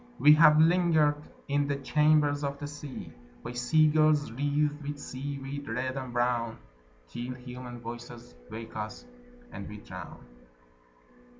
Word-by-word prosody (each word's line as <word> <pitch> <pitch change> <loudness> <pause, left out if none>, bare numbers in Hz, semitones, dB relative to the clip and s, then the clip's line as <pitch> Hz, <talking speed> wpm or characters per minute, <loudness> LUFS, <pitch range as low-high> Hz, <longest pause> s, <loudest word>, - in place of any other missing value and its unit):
We 150 - +8
have 150 0 +7
lingered 160 -3 +4 0.3
in 145 0 +1
the 140 - 0
chambers 150 +1 +2
of 140 0 -2
the 145 - -6
sea 145 -2 -8 0.3
By 120 - -5
sea 125 +6 +3
girls 155 -3 +3
wreathed 145 +3 0
with 145 0 -5
seaweed 140 0 -6
red 130 +3 -2
and 130 -2 -5
brown 120 -1 0 0.5
Till 120 - -6
human 125 -1 -9
voices 120 - -9 0.2
wake 115 +1 -8
us, 110 - -6 0.5
and 100 - -7
we 105 - -8
drown. 105 - -10
140 Hz, 135 wpm, -29 LUFS, 120-150 Hz, 0.5 s, We